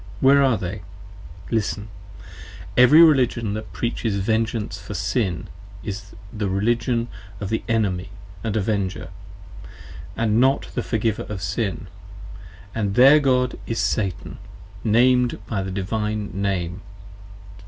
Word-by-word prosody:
Where 140 Hz, +1 st, +6 dB
are 130 Hz, -5 st, +3 dB
they? 95 Hz, 0 st, -5 dB, 0.7 s
Listen! 105 Hz, -2 st, -1 dB, 0.9 s
Every 125 Hz, +7 st, +8 dB
Religion 125 Hz, -8 st, +3 dB
that 110 Hz, +1 st, -6 dB
Preaches 115 Hz, -3 st, -2 dB
Vengeance 110 Hz, +2 st, -1 dB
for -, -, -7 dB
Sin 95 Hz, -9 st, -1 dB, 0.4 s
is 100 Hz, 0 st, -7 dB, 0.2 s
the 105 Hz, -3 st, -2 dB
Religion 115 Hz, +4 st, 0 dB, 0.3 s
of 100 Hz, -, -4 dB
the 110 Hz, -, -1 dB
Enemy 100 Hz, -5 st, 0 dB, 0.2 s
& 100 Hz, -, -17 dB
Avenger: 100 Hz, -5 st, -1 dB, 1.1 s
and 110 Hz, -1 st, +2 dB
not 135 Hz, +2 st, +3 dB
of -, -, -14 dB
the -, -, -1 dB
Forgiver 110 Hz, -2 st, -1 dB
of 100 Hz, -3 st, -5 dB
Sin: 95 Hz, -1 st, -2 dB, 0.9 s
and 100 Hz, -3 st, -1 dB
their 135 Hz, +4 st, +8 dB
God 125 Hz, -3 st, +1 dB
is 115 Hz, -, -2 dB
Satan, 100 Hz, -6 st, -2 dB, 0.4 s
Named 125 Hz, +2 st, +3 dB
by 100 Hz, -4 st, -2 dB
the 95 Hz, -, -4 dB
Divine 105 Hz, +2 st, -2 dB
Name. 95 Hz, -2 st, -2 dB
110 Hz, 120 wpm, -23 LUFS, 100-120 Hz, 1.1 s, Every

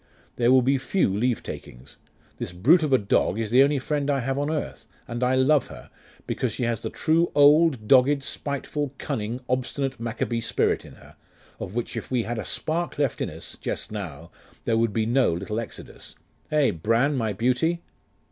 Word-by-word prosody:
There 120 Hz, 0 st, +3 dB
will 130 Hz, -1 st, +6 dB
be 135 Hz, +2 st, +2 dB
few 135 Hz, -, +1 dB
leavetakings. 105 Hz, -, -4 dB, 0.4 s
This -, -, -4 dB
brute 135 Hz, -, +5 dB
of 155 Hz, -3 st, -1 dB
a 130 Hz, -, +6 dB
dog 100 Hz, -2 st, +1 dB
is 115 Hz, -2 st, -2 dB
the 125 Hz, +2 st, +6 dB
only 140 Hz, +1 st, +4 dB
friend 145 Hz, +2 st, -1 dB
I 140 Hz, -, +2 dB
have 135 Hz, +3 st, -1 dB
on 145 Hz, +1 st, -1 dB
earth; 150 Hz, -7 st, -4 dB, 0.2 s
and 120 Hz, +1 st, -3 dB
I 125 Hz, +1 st, +3 dB
love 135 Hz, +2 st, +3 dB
her, -, -, -12 dB, 0.3 s
because 125 Hz, -, -2 dB
she 110 Hz, -, -4 dB
has 115 Hz, -2 st, 0 dB
the -, -, -4 dB
true 165 Hz, +2 st, +1 dB
old, 145 Hz, -5 st, +5 dB
dogged, 135 Hz, +2 st, +5 dB
spiteful, 140 Hz, 0 st, -3 dB
cunning, 115 Hz, +4 st, -3 dB
obstinate 130 Hz, +1 st, -2 dB
Maccabee 115 Hz, 0 st, -2 dB
spirit -, -, 0 dB
in -, -, -12 dB
her -, -, -17 dB, 0.4 s
of 95 Hz, -, -6 dB
which 120 Hz, -, -3 dB
if -, -, -5 dB
we 125 Hz, -3 st, +1 dB
had 120 Hz, 0 st, -3 dB
a 105 Hz, -, -5 dB
spark 170 Hz, +2 st, -2 dB
left 140 Hz, -4 st, 0 dB
in -, -, -1 dB
us -, -, -9 dB
just 100 Hz, -, -4 dB
now, 85 Hz, -6 st, -7 dB, 0.3 s
there 115 Hz, -, +2 dB
would 115 Hz, -1 st, +2 dB
be 110 Hz, +1 st, 0 dB
no 120 Hz, -4 st, +2 dB
little 100 Hz, +6 st, -3 dB
Exodus; 115 Hz, -, -8 dB, 0.4 s
eh, 150 Hz, -3 st, +3 dB
Bran, 115 Hz, -, +1 dB
my 115 Hz, -4 st, 0 dB
beauty? 130 Hz, +10 st, 0 dB
125 Hz, 190 wpm, -25 LUFS, 115-140 Hz, 0.4 s, will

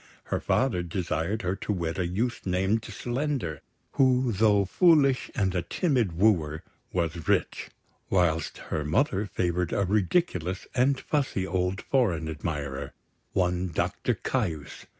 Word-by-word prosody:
Her -, -, -2 dB
father 125 Hz, -9 st, +1 dB
desired 85 Hz, +3 st, -2 dB
her 90 Hz, +1 st, 0 dB
to -, -, -3 dB
wed 85 Hz, -3 st, -2 dB
a 90 Hz, -, +1 dB
youth 115 Hz, +7 st, -1 dB
named 95 Hz, +4 st, +1 dB
Slender, 120 Hz, -, -3 dB, 0.3 s
who, 130 Hz, -2 st, +3 dB
though 100 Hz, -1 st, +3 dB
foolish 145 Hz, -, +4 dB
and 95 Hz, -3 st, +1 dB
a 90 Hz, -, 0 dB
timid 120 Hz, -, 0 dB
wooer, 85 Hz, -7 st, +2 dB, 0.3 s
was 85 Hz, -2 st, -2 dB
rich; -, -, 0 dB, 0.4 s
whilst 85 Hz, -4 st, +1 dB, 0.2 s
her 75 Hz, -, 0 dB
mother 100 Hz, -, +1 dB
favoured 90 Hz, -2 st, -1 dB
a 100 Hz, -, +1 dB
ridiculous 95 Hz, -, 0 dB
and 130 Hz, +2 st, +2 dB
fussy 135 Hz, -10 st, -1 dB
old 95 Hz, +1 st, -1 dB
foreign 95 Hz, -, +1 dB
admirer, 70 Hz, -3 st, -4 dB, 0.4 s
one 90 Hz, 0 st, +1 dB
Doctor 80 Hz, -, -1 dB
Caius. 80 Hz, -4 st, -3 dB
95 Hz, 130 wpm, -27 LUFS, 85-120 Hz, 0.4 s, foolish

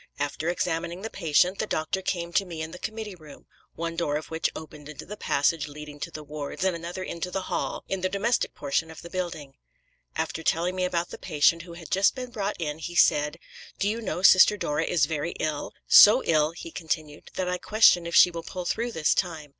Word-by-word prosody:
After 145 Hz, +3 st, -2 dB
examining 175 Hz, +1 st, -2 dB
the 225 Hz, -, -5 dB
patient, 180 Hz, +2 st, +2 dB
the 215 Hz, -, -1 dB
doctor 160 Hz, +3 st, -1 dB
came 170 Hz, -2 st, -3 dB
to 200 Hz, -, +3 dB
me 165 Hz, -4 st, -6 dB
in 160 Hz, -, -6 dB
the 180 Hz, -, -9 dB
committee 220 Hz, -1 st, -5 dB
room 155 Hz, -5 st, -14 dB, 0.3 s
one 165 Hz, 0 st, -4 dB
door 150 Hz, -4 st, -1 dB
of 155 Hz, -, -8 dB
which 160 Hz, 0 st, 0 dB
opened 150 Hz, -1 st, -10 dB
into 155 Hz, -, -9 dB
the 210 Hz, -, -7 dB
passage 150 Hz, -4 st, +1 dB
leading 150 Hz, 0 st, -10 dB
to -, -, -4 dB
the 155 Hz, -, -8 dB
wards 150 Hz, +3 st, -5 dB
and 190 Hz, -2 st, +1 dB
another 170 Hz, +3 st, -6 dB
into 170 Hz, 0 st, -4 dB
the 190 Hz, +1 st, -3 dB
hall -, -, -3 dB
in 195 Hz, -1 st, -3 dB
the 185 Hz, -, 0 dB
domestic 215 Hz, +5 st, 0 dB
portion 160 Hz, +3 st, -1 dB
of 160 Hz, -, -11 dB
the 170 Hz, -, -10 dB
building. 170 Hz, -7 st, -5 dB, 0.6 s
After -, -, -2 dB
telling 170 Hz, +3 st, 0 dB
me 185 Hz, -1 st, 0 dB
about 175 Hz, -1 st, -1 dB
the -, -, -8 dB
patient 165 Hz, 0 st, +2 dB
who 170 Hz, 0 st, -11 dB
had 170 Hz, -3 st, -11 dB
just 195 Hz, +1 st, +3 dB
been 250 Hz, -2 st, -6 dB
brought 205 Hz, -2 st, -2 dB
in, 150 Hz, -2 st, -3 dB
he 175 Hz, +2 st, -6 dB
said, 150 Hz, -1 st, +3 dB, 0.4 s
'Do 200 Hz, -, 0 dB
you 225 Hz, +3 st, -1 dB
know 185 Hz, -4 st, -4 dB
Sister 190 Hz, +2 st, +7 dB
Dora 150 Hz, -3 st, -1 dB
is 160 Hz, -4 st, +2 dB
very 160 Hz, +2 st, -3 dB
ill? 150 Hz, -2 st, -2 dB, 0.2 s
So 220 Hz, +5 st, +8 dB
ill,' 155 Hz, -1 st, +2 dB
he 165 Hz, 0 st, -9 dB
continued, 155 Hz, -2 st, -4 dB
'that 185 Hz, -, -1 dB
I 180 Hz, 0 st, -1 dB
question 180 Hz, -4 st, +4 dB
if 170 Hz, -, -3 dB
she 180 Hz, -, +8 dB
will 170 Hz, -1 st, -5 dB
pull 180 Hz, +2 st, -6 dB
through 235 Hz, +5 st, -2 dB
this 155 Hz, -2 st, +2 dB
time.' 160 Hz, -5 st, -2 dB
170 Hz, 225 wpm, -26 LUFS, 155-185 Hz, 0.6 s, So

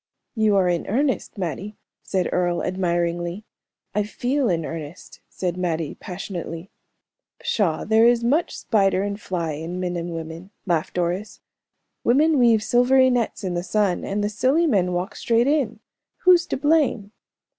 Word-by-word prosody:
"You 220 Hz, -3 st, +2 dB
are 190 Hz, -2 st, +3 dB
in 175 Hz, -1 st, -1 dB
earnest, 260 Hz, +1 st, -1 dB
Mattie," 195 Hz, +3 st, -4 dB, 0.3 s
said 185 Hz, -2 st, -1 dB
Earle, 175 Hz, -1 st, 0 dB
admiringly. 175 Hz, +1 st, -1 dB, 0.5 s
"I 210 Hz, -, +1 dB
feel 245 Hz, +5 st, -1 dB
in 165 Hz, -3 st, 0 dB
earnest," 160 Hz, +1 st, -8 dB
said 180 Hz, -1 st, -3 dB
Mattie, 165 Hz, -4 st, -2 dB
passionately. 180 Hz, -1 st, -7 dB, 0.7 s
"Pshaw, 180 Hz, -8 st, 0 dB
there 220 Hz, +2 st, +5 dB
is 240 Hz, -1 st, +3 dB
much 290 Hz, +8 st, +1 dB
spider 195 Hz, -4 st, +2 dB
and 205 Hz, +1 st, -4 dB
fly 170 Hz, -3 st, -2 dB
in 165 Hz, +4 st, -5 dB
men 180 Hz, -1 st, -2 dB
and 170 Hz, 0 st, -4 dB
women," 165 Hz, +3 st, -7 dB, 0.2 s
laughed 170 Hz, -4 st, -1 dB
Doris. 180 Hz, +4 st, -2 dB, 0.6 s
"Women 295 Hz, +5 st, +4 dB
weave 230 Hz, -3 st, +4 dB
silvery 260 Hz, +2 st, +4 dB
nets 235 Hz, -3 st, -1 dB
in 185 Hz, -2 st, -2 dB
the 175 Hz, -, -1 dB
sun, 200 Hz, 0 st, 0 dB
and 205 Hz, +1 st, -2 dB
the 205 Hz, -, 0 dB
silly 265 Hz, +10 st, +2 dB
men 195 Hz, -, +2 dB
walk 180 Hz, +4 st, -3 dB
straight 235 Hz, 0 st, +2 dB
in. 265 Hz, -7 st, 0 dB, 0.4 s
Who's 360 Hz, -1 st, +5 dB
to -, -, -2 dB
blame?" 280 Hz, -8 st, +1 dB
195 Hz, 155 wpm, -23 LUFS, 175-235 Hz, 0.7 s, there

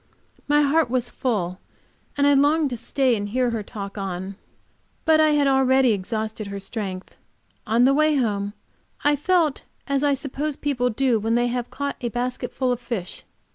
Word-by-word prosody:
My 295 Hz, 0 st, +4 dB
heart 290 Hz, -1 st, +2 dB
was 245 Hz, -1 st, -1 dB
full, 190 Hz, -7 st, -2 dB, 0.6 s
and 285 Hz, -, +3 dB
I 285 Hz, -, +5 dB
longed 290 Hz, +1 st, +3 dB
to -, -, -2 dB
stay 255 Hz, +2 st, +1 dB
and 205 Hz, -1 st, -4 dB
hear 250 Hz, +2 st, +1 dB
her 225 Hz, -2 st, -2 dB
talk 200 Hz, -1 st, -7 dB
on. 190 Hz, 0 st, -4 dB, 0.7 s
But 320 Hz, -1 st, +5 dB
I 310 Hz, -1 st, +4 dB
had 290 Hz, -1 st, +3 dB
already 265 Hz, -2 st, +4 dB
exhausted 215 Hz, +2 st, -4 dB
her 200 Hz, 0 st, -5 dB
strength. 195 Hz, -2 st, -5 dB, 0.5 s
On 230 Hz, +3 st, +3 dB
the 270 Hz, +2 st, +5 dB
way 305 Hz, +1 st, +3 dB
home 205 Hz, -6 st, -1 dB, 0.5 s
I 290 Hz, 0 st, +4 dB
felt 315 Hz, -1 st, +1 dB, 0.2 s
as 275 Hz, -1 st, 0 dB
I 285 Hz, -1 st, +3 dB
suppose 280 Hz, +2 st, -3 dB
people 250 Hz, -4 st, 0 dB
do 245 Hz, 0 st, +1 dB
when 225 Hz, +2 st, 0 dB
they 240 Hz, 0 st, +2 dB
have 245 Hz, 0 st, -3 dB
caught 280 Hz, 0 st, -4 dB
a 240 Hz, -, -1 dB
basketful 250 Hz, +2 st, -2 dB
of 245 Hz, -, -1 dB
fish. 230 Hz, -7 st, -5 dB
250 Hz, 175 wpm, -23 LUFS, 215-280 Hz, 0.7 s, I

